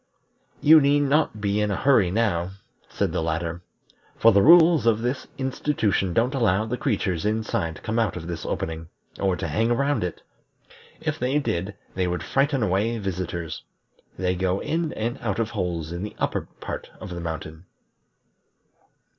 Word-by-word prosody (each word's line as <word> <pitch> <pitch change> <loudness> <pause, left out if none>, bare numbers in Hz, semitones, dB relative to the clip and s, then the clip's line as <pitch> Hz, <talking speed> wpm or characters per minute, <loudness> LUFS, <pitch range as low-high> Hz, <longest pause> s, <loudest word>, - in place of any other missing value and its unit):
"You 155 +1 +8
need 145 +1 +3
not 145 -5 +1
be 105 0 0
in 105 - +1
a 100 - 0
hurry 115 -4 +4
now," 95 -3 0 0.4
said - - -1
the - - -1
latter, 80 +1 -2 0.6
"for 115 - +6
the 100 -1 +5
rules 165 - +7
of 115 0 +3
this 125 +2 -2
institution 130 -8 0
don't 120 +8 +1
allow 110 -5 +2
the 115 +3 -2
creatures 100 - -1
inside 105 -5 -1
to - - -14
come 110 +1 -1
out 110 -6 0
of 80 - -7
this 85 -2 -5
opening, 80 0 -4 0.3
or 95 -2 +1
to 85 - -4
hang 110 +9 +1
around 140 0 +1
it. 90 -2 -5 0.8
If - - -2
they 130 +4 +1
did, 100 -8 -2 0.2
they 95 -1 0
would 90 -2 -2
frighten 135 -2 +1
away 105 +4 +1
visitors. 90 -5 -4 0.6
They 90 0 0
go 95 +1 0
in 165 0 -1
and 120 +4 -3
out 105 -5 -1
of 115 0 -1
holes 85 -7 -3
in 85 +1 -4
the 105 - -6
upper - - -2
part - - -6
of - - -8
the 85 - -5
mountain." 80 0 -6
105 Hz, 170 wpm, -24 LUFS, 90-125 Hz, 0.8 s, You